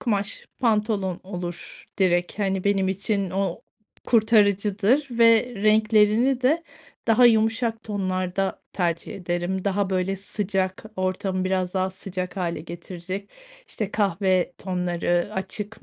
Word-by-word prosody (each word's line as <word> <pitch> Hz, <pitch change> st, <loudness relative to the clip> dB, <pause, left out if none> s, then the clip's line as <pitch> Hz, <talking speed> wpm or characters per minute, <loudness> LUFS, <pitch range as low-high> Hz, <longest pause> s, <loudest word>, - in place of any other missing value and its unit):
kumaş 205 Hz, -4 st, -2 dB
pantolon 210 Hz, -5 st, +1 dB
olur 175 Hz, -2 st, -7 dB
direkt. 175 Hz, 0 st, +1 dB
Hani, 195 Hz, -2 st, 0 dB
benim 195 Hz, -2 st, +2 dB
için 195 Hz, 0 st, -1 dB
o 195 Hz, +3 st, -2 dB, 0.4 s
kurtarıcıdır 215 Hz, +3 st, +3 dB
ve 230 Hz, +1 st, +4 dB
renklerini 215 Hz, +4 st, +3 dB
de 310 Hz, +6 st, +3 dB, 0.5 s
daha 230 Hz, +2 st, +6 dB
yumuşak 225 Hz, 0 st, +2 dB
tonlarda 190 Hz, -2 st, -2 dB
tercih 170 Hz, -3 st, -2 dB
ederim. 180 Hz, +1 st, -2 dB
Daha, 200 Hz, -1 st, 0 dB
böyle, 190 Hz, +1 st, 0 dB
sıcak 195 Hz, -1 st, -2 dB
ortamı 185 Hz, 0 st, -1 dB
biraz 185 Hz, 0 st, -1 dB
daha 185 Hz, 0 st, +1 dB
sıcak 185 Hz, -1 st, -5 dB
hâle 175 Hz, -3 st, -2 dB
getirecek, 175 Hz, +3 st, -7 dB, 0.4 s
işte, 210 Hz, -3 st, -4 dB
kahve 190 Hz, -3 st, +1 dB
tonları, 175 Hz, -1 st, -1 dB
açık 200 Hz, +3 st, -5 dB
195 Hz, 115 wpm, -24 LUFS, 185-215 Hz, 0.5 s, daha